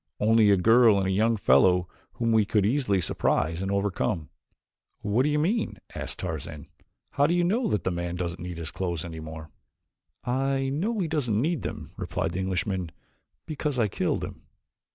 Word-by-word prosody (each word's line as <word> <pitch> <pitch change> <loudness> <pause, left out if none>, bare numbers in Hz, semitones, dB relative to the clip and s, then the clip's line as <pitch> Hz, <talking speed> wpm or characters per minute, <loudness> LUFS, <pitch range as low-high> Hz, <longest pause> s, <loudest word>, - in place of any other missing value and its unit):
Only 110 0 +4
a 100 - +5
girl 115 +2 +5
and 95 - +1
a 95 - 0
young 110 +4 +2
fellow 90 +2 +4 0.3
whom 115 -1 0
we 110 -1 +5
could 105 -1 +1
easily 110 -5 +1
surprise 80 0 0
and 95 - -2
overcome." 100 -4 -1 0.7
"What 105 +4 +1
do 145 - +2
you 150 - +1
mean?" 200 +9 0 0.2
asked - - -5
Tarzan. 80 -3 -5 0.5
"How 145 +1 +3
do 170 - +1
you 175 - +2
know 220 +8 +1
that 105 - 0
the - - 0
man 85 0 -3
doesn't 85 -1 -4
need 90 -1 -6
his 85 -1 -5
clothes 85 -3 -3
any 80 -2 -7
more." 80 0 -8 0.7
"I 135 +2 0
know 195 +12 -1
he 185 -5 0
doesn't 130 -9 0
need 160 +5 0
them," - - -6
replied - - -2
the 90 - -3
Englishman, 95 -1 -1 0.6
"because 150 -3 -3
I 115 -3 +3
killed 95 - -1
him." - - -8
105 Hz, 185 wpm, -27 LUFS, 90-135 Hz, 0.7 s, a